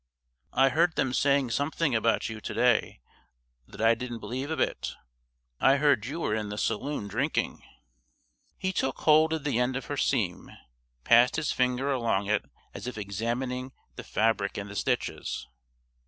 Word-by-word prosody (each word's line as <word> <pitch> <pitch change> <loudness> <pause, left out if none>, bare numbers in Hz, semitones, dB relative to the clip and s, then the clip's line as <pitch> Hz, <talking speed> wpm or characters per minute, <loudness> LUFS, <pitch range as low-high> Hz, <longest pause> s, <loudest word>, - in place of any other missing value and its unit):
"I 135 +1 +5
heard 160 +5 +2
them 130 -1 0
saying 140 -2 +2
something 145 +2 0
about 115 0 +2
you 110 -1 -7
to - - -5
day - - +2 0.7
that - - -13
I 115 +1 +5
didn't 120 0 -5
believe 125 +6 -5
a 160 - -2
bit. - - -1 0.6
I 135 +1 +5
heard 140 -7 +2
you 160 +5 -4
were 105 - 0
in 105 -1 -2
the 105 - -5
saloon 120 +1 -2
drinking." 100 - -1 1.0
He 190 0 -2
took 135 -6 -1
hold 155 +1 +5
of 160 -3 -2
the 140 -5 0
end 125 +1 +1
of 135 - -4
her - - -4
seam, - - 0 0.5
passed 120 - +5
his 155 -2 0
finger 125 +2 +1
along 115 -6 0
it 105 0 +1 0.3
as - - -7
if 125 - -5
examining 120 +6 -3 0.2
the - - -7
fabric 110 -3 0
and 100 0 -5
the - - -9
stitches. 80 - -2
125 Hz, 170 wpm, -28 LUFS, 110-140 Hz, 1.0 s, I